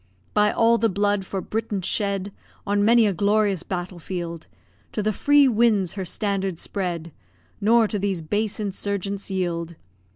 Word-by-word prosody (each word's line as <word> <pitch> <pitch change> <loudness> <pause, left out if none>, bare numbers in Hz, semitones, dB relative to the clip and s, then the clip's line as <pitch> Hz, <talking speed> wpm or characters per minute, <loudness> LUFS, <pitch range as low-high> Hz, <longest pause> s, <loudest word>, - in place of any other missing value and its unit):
By 210 0 +4
all 230 0 +3
the 225 - +2
blood 205 0 0
for 195 - -3
Britain 210 -3 -3
shed 200 0 -1 0.3
On 205 0 +1
many 230 +1 +5
a 205 - +2
glorious 205 -1 +2
battle 180 -1 -5
field, 170 -2 -5 0.5
To 210 - -1
the 215 +1 +1
free 290 +6 +5
winds 220 -6 +2
her 195 -2 -4
standard 195 -1 -2
spread, 170 -3 -3 0.5
Nor 225 +2 +4
to 210 -1 -3
these 190 -4 -1
base 210 +7 -1
insurgents 200 -1 -2
yield. 170 -3 -2
200 Hz, 155 wpm, -24 LUFS, 185-215 Hz, 0.5 s, many